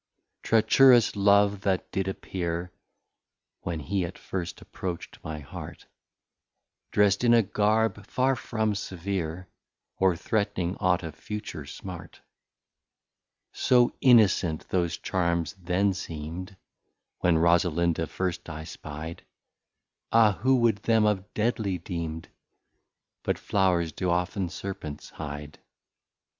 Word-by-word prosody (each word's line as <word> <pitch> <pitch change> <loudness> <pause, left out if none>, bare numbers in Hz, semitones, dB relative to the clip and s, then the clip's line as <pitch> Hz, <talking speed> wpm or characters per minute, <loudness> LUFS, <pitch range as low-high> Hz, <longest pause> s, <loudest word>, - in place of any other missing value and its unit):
Treacherous 115 +2 +5
Love 100 0 +4
that 95 -3 -1
did 95 0 -1
appear, 90 -2 -3 0.9
(When 85 -2 -3
he 90 +6 -1
at 85 +1 -6
first 90 -2 -5
approach't 90 -3 -7
my 80 0 -5
Heart) 70 -3 -9 1.0
Drest 105 +1 +3
in 120 -1 +6
a 115 - +5
Garb 105 +1 +1
far 130 +1 +1
from 110 -2 -1
severe, 95 -2 -4 0.5
Or 95 -2 +3
threatning 95 -1 -1
ought 90 -3 +2
of 80 -2 -6
future 85 -3 -7
smart. 90 0 -9 1.3
So 125 -2 +3
Innocent 100 - +4
those 85 -2 0
Charms 85 -3 -1
then 95 +3 +1
seem'd, 85 +2 -6 0.6
When 90 -2 +3
Rosalinda 85 -1 +2
first 90 +3 -3
I 80 0 -6
spy'd, 80 +1 -8 0.9
Ah! 110 -2 +6
Who 130 +3 +4
would 115 -3 +3
them 110 +1 +2
have 105 -1 0
deadly 110 -4 0
deem'd? 85 -3 -5 0.9
But - - -1
Flowrs 90 -4 +1
do 90 +4 -2
often 90 +2 0
Serpents 85 -5 -7
hide. 75 -1 -7
95 Hz, 110 wpm, -27 LUFS, 85-105 Hz, 1.3 s, in